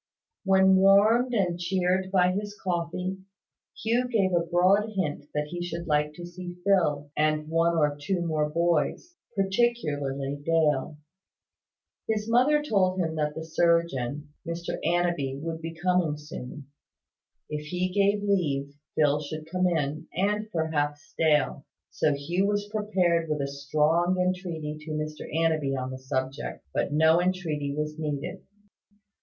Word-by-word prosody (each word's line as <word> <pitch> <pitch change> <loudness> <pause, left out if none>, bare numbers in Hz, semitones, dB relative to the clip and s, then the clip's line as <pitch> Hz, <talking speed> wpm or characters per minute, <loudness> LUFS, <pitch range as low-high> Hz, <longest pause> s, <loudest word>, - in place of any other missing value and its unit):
When 190 0 +5
warmed 215 +6 +5
and 180 -4 +1
cheered 185 +1 0
by 180 -2 +4
his 205 +2 -4
coffee, 180 +1 -2 0.6
Hugh 240 +3 +2
gave 200 -6 +1
a 175 - +4
broad 185 +5 +2
hint 150 -6 -2
that 150 0 -1
he 175 +1 -5
should 170 0 -5
like 150 -1 +1
to 175 - -8
see 175 0 -8
Phil, 150 -7 +2
and 155 0 +1
one 165 +1 +2
or 150 -2 +2
two 175 +3 -1
more 155 -2 0
boys 170 - 0 0.2
particularly 145 - 0
Dale. 150 -3 +1 1.1
His 215 -1 0
mother 260 +6 +4
told 190 -8 +1
him 165 -3 0
that 150 -1 -1
the 160 - -5
surgeon, 155 -4 +1
Mr 170 0 -4
Annanby, 170 -6 0
would 165 +1 -5
be 165 0 -6
coming 175 -2 +1
soon. 150 -1 -8 0.8
If 150 0 -5
he 180 +3 -1
gave 205 +1 +2
leave, 140 -8 0 0.2
Phil 150 -1 +3
should 155 +2 -7
come 185 0 +2
in, 155 -3 -1
and 210 +3 0
perhaps 150 -3 -2
Dale. 150 -3 +2 0.3
So 150 - +1
Hugh 170 +8 0
was 205 0 0
prepared 185 -6 +1
with 150 -1 0
a 140 - -1
strong 155 +6 +1
entreaty 175 -5 -2
to 155 +1 -8
Mr 155 0 -5
Annanby 155 -3 +1
on 130 0 -4
the 130 - -6
subject; 130 - -4
but - - 0
no 160 +3 +4
entreaty 160 -6 -1
was 150 +1 -3
needed. 150 -1 -3
165 Hz, 145 wpm, -27 LUFS, 150-185 Hz, 1.1 s, When